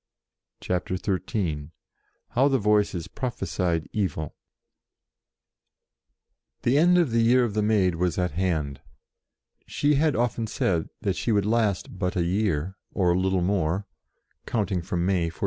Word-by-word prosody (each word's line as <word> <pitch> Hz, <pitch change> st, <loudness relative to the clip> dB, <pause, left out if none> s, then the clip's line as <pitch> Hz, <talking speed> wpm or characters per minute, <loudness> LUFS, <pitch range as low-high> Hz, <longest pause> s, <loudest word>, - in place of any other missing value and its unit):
CHAPTER 90 Hz, 0 st, -2 dB
XIII 90 Hz, -6 st, -2 dB, 0.6 s
HOW 130 Hz, +3 st, +3 dB
THE 135 Hz, -1 st, +3 dB
VOICES 105 Hz, -6 st, +1 dB
PROPHESIED 90 Hz, -9 st, -2 dB
EVIL 80 Hz, -7 st, -2 dB, 2.3 s
THE 130 Hz, +4 st, +3 dB
end 175 Hz, +2 st, +5 dB
of 170 Hz, -8 st, +2 dB
the 115 Hz, 0 st, +3 dB
year 125 Hz, +2 st, +4 dB
of 115 Hz, -4 st, -1 dB
the 105 Hz, -, +1 dB
Maid 105 Hz, -4 st, +2 dB
was 85 Hz, 0 st, -1 dB
at 90 Hz, -2 st, 0 dB
hand. 75 Hz, -5 st, -1 dB, 0.9 s
She 145 Hz, +1 st, +1 dB
had 150 Hz, +1 st, +2 dB
often 120 Hz, -1 st, 0 dB
said 85 Hz, -6 st, 0 dB
that 95 Hz, -2 st, 0 dB
she 120 Hz, -, -1 dB
would 100 Hz, -2 st, +2 dB
last 105 Hz, -5 st, 0 dB
but 90 Hz, -2 st, -1 dB
a 90 Hz, -, +1 dB
year, 95 Hz, -1 st, -1 dB
or 90 Hz, -3 st, +2 dB
little 95 Hz, 0 st, +1 dB
more, 95 Hz, 0 st, 0 dB, 0.6 s
count 105 Hz, -4 st, -1 dB
ing 90 Hz, -2 st, 0 dB
from 85 Hz, 0 st, -2 dB
May 90 Hz, -3 st, +2 dB
1429. 85 Hz, -, -3 dB
95 Hz, 145 wpm, -26 LUFS, 85-110 Hz, 2.3 s, end